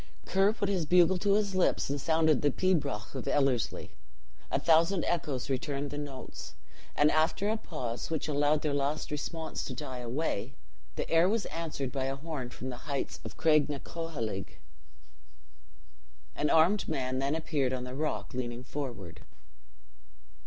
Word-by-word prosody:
Ker 195 +2 +4
put 210 -2 -2
his 185 -6 0
bugle 180 +1 +5
to 200 +1 +3
his 205 -2 +1
lips, 185 -1 +2
and 140 0 -2
sounded 160 -2 +3
the 145 - +4
pibroch 150 - 0
of 130 -3 -5
Ellerslie. 130 -6 +1 0.6
A - - +1
thousand 170 +3 +4
echoes 150 -7 -1
returned 140 +1 -2
the 145 - -4
notes; 140 -3 -7 0.4
and 150 +1 +5
after 160 +6 +2
a 220 - +2
pause, 130 - -4
which 160 -2 -1
allowed 145 0 +2
their 150 -2 +1
last 145 +2 -1
response 160 +2 -4
to - - -5
die 130 -4 -5
away, 125 -1 -2 0.4
the - - -2
air 165 +3 +4
was 220 0 0
answered 155 -6 -4
by 135 -2 -1
a 135 0 -1
horn 140 -4 -5
from 130 +1 -6
the 125 - -5
heights 140 -1 -2
of - - -8
Cragnacoheilg. 150 - 0 1.9
An 150 - +1
armed 170 +6 +4
man 130 -1 -1
then 140 +3 +1
appeared 150 -5 0
on 130 -1 -2
the 125 0 -6
rock, 150 +1 -2
leaning 120 -1 -4
forward. 120 - -6
145 Hz, 155 wpm, -31 LUFS, 130-165 Hz, 1.9 s, bugle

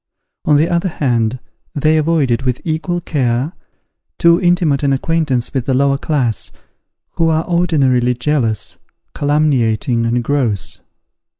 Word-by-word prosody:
On 150 - +4
the 155 +3 +3
other 170 +2 0
hand, 120 -6 0 0.4
they 155 +2 +2
avoided, 150 -6 +1
with 125 -2 -1
equal 170 +2 -2
care, 135 -1 -1 0.6
too 170 0 +4
intimate 175 -6 +2
an 140 -2 +2
acquaintance 135 -4 -1
with 130 -4 -2
the 130 - +1
lower 140 +1 +2
class, 125 - -1 0.7
who 165 -1 +2
are 160 0 +1
ordinarily 135 -9 +2
jealous, 120 -5 -1 0.3
calumniating, 130 -5 +1
and 120 +1 0
gross. 120 -7 -1
140 Hz, 125 wpm, -16 LUFS, 125-160 Hz, 0.7 s, On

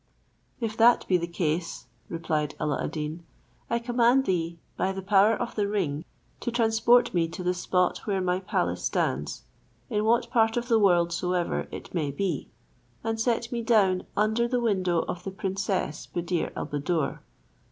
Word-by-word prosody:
"If 225 -3 -2
that 235 +1 +5
be 185 - +4
the 170 0 -3
case," 170 0 -2 0.2
replied 155 -3 -2
Alla 150 -2 -1
ad - - -1
Deen, 155 +2 -4 0.5
"I 235 - +2
command 240 +2 +3
thee, 170 -2 -1 0.2
by 190 - 0
the 190 0 -6
power 205 +3 +5
of 240 +2 -4
the 205 -2 0
ring, 170 -7 -1 0.3
to - - -2
transport 235 +1 +3
me 170 -2 +2
to 170 +2 -7
the 180 0 +1
spot 180 0 +1
where 195 -2 +1
my 180 0 0
palace 90 - -1
stands, 70 +3 -1 0.5
in 210 - +1
what 230 +2 +2
part 225 0 +3
of 240 +1 -2
the 225 -2 +5
world 175 -4 +3
soever 180 0 -1
it - - -9
may 155 -5 0
be, 165 +1 -2 0.5
and 225 0 -2
set 235 0 0
me 235 -1 -2
down 200 -5 +3
under 220 +3 +2
the 250 0 0
window 185 -7 +1
of 180 - -5
the 195 - -4
princess 195 -3 -2
Buddir 175 0 -2
al - - -3
Buddoor." 145 0 -1
190 Hz, 175 wpm, -27 LUFS, 170-225 Hz, 0.5 s, that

